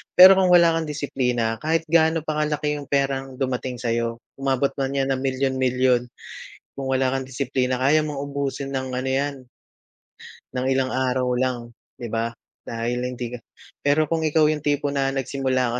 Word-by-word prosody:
Pero 190 +1 +9
kung 185 - +4
wala 170 -2 +5
kang 160 - -4
disiplina, 125 -6 -1
kahit 160 +4 0
gaano 160 -1 +3
pa 155 -1 -2
kalaki 150 -1 -1
'yong 140 - -9
perang 135 -1 -1
dumating 130 -1 -2
sa'yo, 115 -1 -1 0.2
umabot 135 0 +1
man 135 0 -1
yan 135 0 +1
ng 130 - 0
milyon-milyon, 130 -2 +1 0.7
kung 135 -1 -4
wala 130 0 +1
kang 135 - -2
disiplina, 130 -1 -1
kaya 145 +4 +3
mong 150 -2 -4
ubusin 140 -1 -3
nang 130 -1 -3
ano 130 +1 -3
yan, 140 +2 0 1.2
nang 130 0 -1
ilang 130 -1 +1
araw 130 0 0
lang, 125 -2 -2 0.2
'di 120 - -7
ba? 115 +1 0 0.3
Dahil 120 +2 -3
hindi 125 -1 -4
ka 120 - -7 0.4
pero 145 +2 +3
kung 160 +2 -1
ikaw 155 0 +3
'yong 150 0 +1
tipo 145 -1 0
na 135 -1 +1
nagsimula 130 -2 -1
135 Hz, 165 wpm, -23 LUFS, 125-145 Hz, 1.2 s, Pero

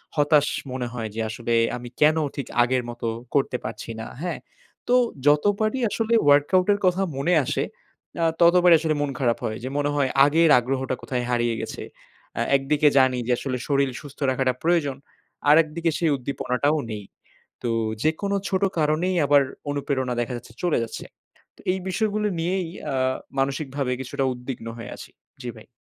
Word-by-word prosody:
হতাশ 145 0 +4 0.2
মনে 125 -1 -3
হয় 115 -3 -4
যে 115 - -2
আসলে 115 +1 -3 0.2
আমি 120 0 -8
কেন 155 +2 +5 0.2
ঠিক 140 - -4 0.2
আগের 125 0 0
মতো 120 -1 -5 0.3
করতে 135 -2 +2
পারছি 115 +1 -6
না। - - -6 0.2
হ্যাঁ? 180 - -3 0.5
তো - - +6 0.3
যতবারই 205 - +3
আসলে 225 +2 -1
ওয়ার্কআউট 145 +7 +4
এর 200 - -2
কথা 180 +1 +2 0.2
মনে 170 +6 +1
আসে - - -1 0.6
আ - - +3 0.2
ততবারই 175 0 +7
আসলে 155 -1 0
মন 145 - 0
খারাপ 120 -3 +2
হয়। 110 0 -3
যে 130 - -3
মনে 145 0 +1
হয় 140 -2 +2 0.2
আগের 160 +2 +4
আগ্রহটা 130 +1 -2
কোথায় 125 -2 -2
হারিয়ে 120 -1 +1
গেছে। - - -6 0.6
আ - - +1
একদিকে 145 +2 +2
জানি 130 -1 +4
যে - - +1
আসলে 130 -2 -3
শরীল 140 -2 +2
সুস্থ 145 -1 -13
রাখাটা 130 -1 +1
প্রয়োজন। 160 -6 +1 0.5
আরেকদিকে 165 +2 +4
সেই 165 -3 +1
উদ্দীপনাটাও 140 +3 -1
নেই। 105 -2 -6 0.6
তো 120 - -1 0.3
যে 155 - +4
কোনো 200 0 0
ছোট 190 0 0 0.2
কারণেই 160 +5 +1
আবার 145 0 +5 0.3
অনুপ্রেরণা 135 -3 -1
দেখা 120 +1 -3
যাচ্ছে 115 -1 -13
চলে 175 - +2
যাচ্ছে। 115 - -7 0.5
তো - - -16
এই 190 - -3
বিষয়গুলো 210 +1 0
নিয়েই 180 +1 -1 0.3
আ - - -1 0.4
মানসিকভাবে 135 -1 -1
কিছুটা 130 +1 -3
উদ্বিগ্ন 125 -2 -7
হয়ে 115 - -8
আছি। - - -11 0.3
জ্বি 120 - -4
ভাই। 110 - -14
140 Hz, 165 wpm, -24 LUFS, 125-165 Hz, 0.6 s, ততবারই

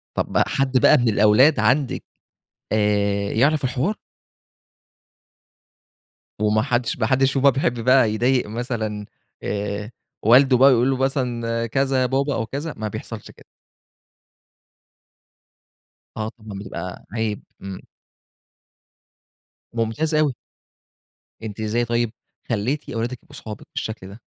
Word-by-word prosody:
طب - - -1
حد 135 -1 +1
بقى - - +7
من 120 -2 +2
الأولاد 110 +7 +5
عندِك 125 +5 +1 0.7
آآ 100 -1 +1
يعرف 140 +5 +2
الحوار؟ 130 - 0 2.4
وما 105 0 +2
حدش 120 +1 -1
ما 110 - +1
حدش 130 +2 +2
فيهم 135 - 0
بقى 140 - +7
بيحب 125 -3 -1
بقى 120 -2 +4
يضايق 125 +2 +1
مثلًا، 110 -2 -3 0.4
آآ، 105 +2 -3 0.3
والده 125 +3 +6
بقى 135 +3 +7
ويقول 125 +1 +3
له 135 - +1
مثلًا 120 -4 -1
كذا 135 +2 +1
يا 125 - +3
بابا 135 +2 0
أو 115 - -1
كذا، 145 +7 -5
ما 110 - -3
بيحصلش 105 - -7
كده؟ - - -19 2.7
آه 110 0 -2
طبعًا 110 -4 -10
بتبقى 90 -3 -7
عيب، 110 -2 -2 0.2
امم. 95 -1 -8 1.9
ممتاز 120 +8 -1
أوي. 150 -4 +2 1.1
أنتِ 110 -1 -6
إزاي 115 +3 0
طيب 115 -1 0 0.4
خليتِ 125 +7 -1
أولادك 120 0 -4
يبقوا 145 - -16
صحابِك 110 -6 -9
بالشكل 110 -4 -4
ده؟ 100 +4 -12
120 Hz, 120 wpm, -22 LUFS, 110-135 Hz, 2.7 s, بقى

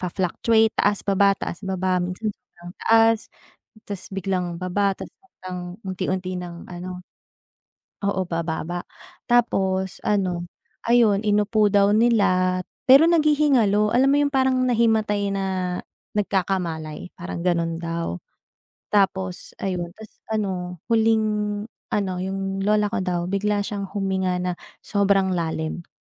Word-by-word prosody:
fa-fluctuate 210 +5 +1
taas, 205 -1 +2
baba, 200 0 +4
taas, 175 - -5
baba. 185 -1 0
Minsan 180 +4 -3
sobrang 175 -8 -14
taas, 225 0 +5 0.7
tapos 200 -3 -5
biglang 185 -2 -2
baba, 185 +3 0
tapos - - -9
biglang 185 - -9 0.2
unti-unti 185 -1 -2
nang 175 -1 -8
ano 180 +1 -6 1.1
oo, 195 -1 +1
bababa. 170 +1 -3 0.5
Tapos 190 -6 +1
ano, 185 -4 0 0.4
ayon 230 -4 +4
inupo 210 0 +2
daw 200 0 +4
nila, 190 -6 +3 0.3
pero 275 +5 +9
naghihingalo. 285 -11 +3
Alam 260 +3 +4
mo 285 - +4
yung 285 - -4
parang 260 -1 +3
nahimatay 220 -4 +2
na 195 0 -1 0.7
nagkakamalay, 180 -6 -2
parang 175 -1 -6
gano'n 170 -2 +1
daw. 165 - -3 0.7
Tapos 190 -3 0
ayon, 180 -3 -1
tapos 220 0 -14
ano, 185 -5 -3
huling 225 -1 +3 0.7
ano 200 -3 0
yung 195 +1 -3
lola 210 0 +2
ko - - -1
daw 180 -1 -2
bigla 205 +1 +1
siyang 200 -1 -4
huminga 190 -2 0
na 180 0 -1 0.3
sobrang 200 -2 +2
lalim 165 -1 -2
195 Hz, 120 wpm, -23 LUFS, 180-210 Hz, 1.1 s, pero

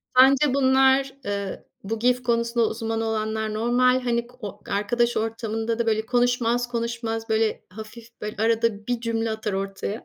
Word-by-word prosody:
Sence 265 +1 +6
bunlar, 265 0 +4
eee, 200 -1 -4 0.2
bu 220 +3 -3
GIF 250 +1 +2
konusunda 235 -1 +1
uzman 225 0 -3
olanlar 220 -1 -2
normal 250 +3 +2
hani 235 -1 0
ko 250 +1 -20
o 205 -3 -7
arkadaş 235 +4 +1
ortamında 225 0 -2
da 235 - +1
böyle 220 -1 +1
konuşmaz 245 0 +1
konuşmaz, 230 -1 -3
böyle, 220 0 +1
hafif 225 +4 -12
böyle 210 0 -5
arada 225 -2 +1
bir 245 -2 -1
cümle 230 -1 -1
atar 215 -2 -3
ortaya. 195 +2 -4
230 Hz, 155 wpm, -24 LUFS, 220-245 Hz, 0.2 s, Sence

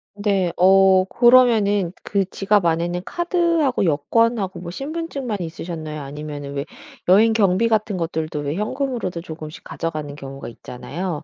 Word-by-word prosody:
네. 200 -4 0
어 190 0 +5
그러면은 220 -6 +4
그 200 -1 0
지갑 195 -1 +1
안에는 170 +2 0
카드하고 340 - +1
여권하고 190 +5 +1
뭐 170 0 -7
신분증만 275 - -4
있으셨나요? 160 -2 -6
아니면은 145 0 -7
왜 140 0 -3 0.4
여행 210 +5 +6
경비 215 0 +2
같은 215 -2 +1
것들도 160 -3 -3
왜 145 +1 -3
현금으로도 230 -4 -2
조금씩 155 -2 -9
가져가는 155 -3 -5
경우가 135 -1 -8
있잖아요. 155 +8 -6
185 Hz, 340 characters per minute, -21 LUFS, 160-225 Hz, 0.4 s, 여행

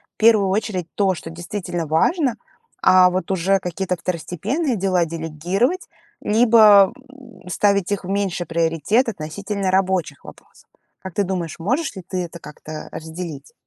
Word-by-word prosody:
в - - -69
первую 215 -3 +4
очередь 190 -3 -2
то, 195 -2 +2
что 165 - -8
действительно 175 0 -5
важно, 250 - +2 0.5
а 185 -1 +6
вот 185 +1 -3
уже 190 +1 +2
какие-то 180 +1 -3
второстепенные 195 - -2
дела 185 -3 +1
делегировать, 170 - -2 0.3
либо, 215 -3 +6 0.2
м, 240 -10 -16
ставить 200 +1 +1
их 205 - -1
в 180 - -7
меньший 195 -3 -1
приоритет 165 - +1
относительно 195 +2 -4
рабочих 185 -6 0
вопросов. - - -16 0.3
Как 190 -2 -8
ты 205 - +1
думаешь, 175 -4 -3
можешь 255 - -1
ли 190 - -8
ты 185 -1 -2
это 170 0 -11
как-то 155 0 -9
разделить? 160 -3 -7
185 Hz, 145 wpm, -21 LUFS, 170-205 Hz, 0.5 s, а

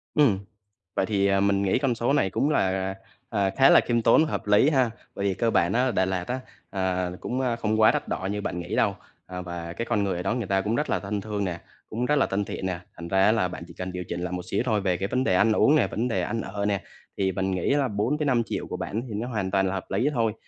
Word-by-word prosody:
Ừm, 125 -11 +4 0.6
vậy - - +1
thì, 100 -2 +1
à, 95 0 +3
mình 100 0 +2
nghĩ 95 +4 +2
con 135 -3 +1
số 120 +4 0
này 95 -9 +2
cũng 140 +9 +1
là, - - +3
à, 95 0 -2 0.4
à, 100 -3 +1
khá 135 0 +6
là - - +8
khiêm 120 -1 0
tốn, 115 +8 +5
hợp 155 - -3
lý 105 +8 +5
ha. 130 -6 +2 0.2
Bởi 100 - -3
vì 95 - +1
cơ 115 +3 +1
bản 85 -3 +2
á 125 +3 +2
Đà 95 - +2
Lạt 90 -1 -2
á, 130 +1 -2 0.3
ờ, 90 -2 -1
cũng 125 +2 -3 0.2
không 110 0 +1
quá 110 - +7
đắt - - -2
đỏ 95 - -2
như 105 0 -2
bạn 90 - -3
nghĩ 85 - -4
đâu, - - +2 0.3
à, 90 0 -6
và 85 -1 -6
cái 115 +7 -4
con 105 -4 +1
người 95 -3 -1
ở 90 - -3
đó 100 +6 0
người 120 -4 -2
ta 95 0 +1
cũng 105 +3 -1
rất 150 - -1
là - - +1
thân 100 +1 -3
thương 105 -1 -3
nè, 90 -3 -3 0.3
cũng 120 +3 -2
rất 150 - +2
là - - +3
thân 100 +1 -1
thiện 95 - -5
nè, 90 -2 -3 0.2
thành 85 - -7
ra 95 +2 +2
á 105 - +5
là 110 -5 +1
bạn 85 - -7
chỉ 85 - -12
cần 90 +2 -5
điều 90 0 -4
chỉnh 85 - -3
lại 90 0 -3
một 90 0 -3
xíu - - +1
thôi. 110 -5 +1
Về 95 -2 +1
cái 95 +2 -3
vấn 130 +3 0
đề 95 - +2
ăn 110 +4 +4
uống 140 +7 +4
nè, - - +4
vấn 120 +3 -2
đề 95 -6 0
ăn 115 +5 -2
ở 100 +1 -3
nè, 100 -2 0 0.4
thì 95 -1 +1
mình 95 +1 -1
nghĩ 95 +8 +1
là 140 -2 +2
4 110 +8 0
tới 150 - -1
5.000.000 120 -4 0
của - - -5
bạn 110 - -3
thì 110 - -6
nó 115 +4 -3
hoàn 105 -6 -2
toàn 95 0 +2
là 95 - -1
hợp 95 - -3
lý 110 +9 +1
thôi. 115 -3 +1
100 Hz, 295 wpm, -26 LUFS, 95-115 Hz, 0.6 s, là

